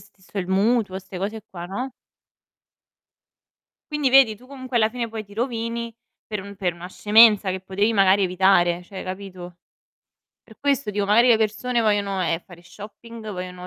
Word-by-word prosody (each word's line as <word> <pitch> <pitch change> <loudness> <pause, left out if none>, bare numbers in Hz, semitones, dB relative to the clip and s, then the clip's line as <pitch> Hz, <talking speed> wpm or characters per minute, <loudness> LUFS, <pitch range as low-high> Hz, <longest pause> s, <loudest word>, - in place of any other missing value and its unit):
stesso 195 0 -11
il 180 - -2
mutuo, 195 0 +1
ste 190 -1 -9
cose 210 +3 -4
qua, 175 -2 -7
no? 245 +9 -4 2.0
Quindi 295 -3 +1
vedi 260 -5 +6
tu 250 +4 -18
comunque, 260 -2 -6
alla 220 -2 +4
fine, 240 -1 -4
poi 220 -1 -6
ti 200 - -18
rovini 230 0 -3 0.3
per 210 -2 -4
un 200 0 -11
per 180 -2 -1
una 175 +1 -9
scemenza 210 0 +5
che 185 0 -3
potevi 200 +4 0
magari 195 -1 +4
evitare, 180 -1 +3
cioè, 190 +2 -9
capito. 185 -2 -8 0.8
Per 220 - -19
questo 280 -5 0
dico 205 -1 -1
magari 235 +4 +5
le 235 - +6
persone 225 +3 0
vogliono, 205 -3 0
ehm, 165 -1 0
fare 175 -1 -16
shopping, 215 +4 -11
vogliono 180 -1 -7
205 Hz, 165 wpm, -23 LUFS, 185-230 Hz, 2.0 s, vedi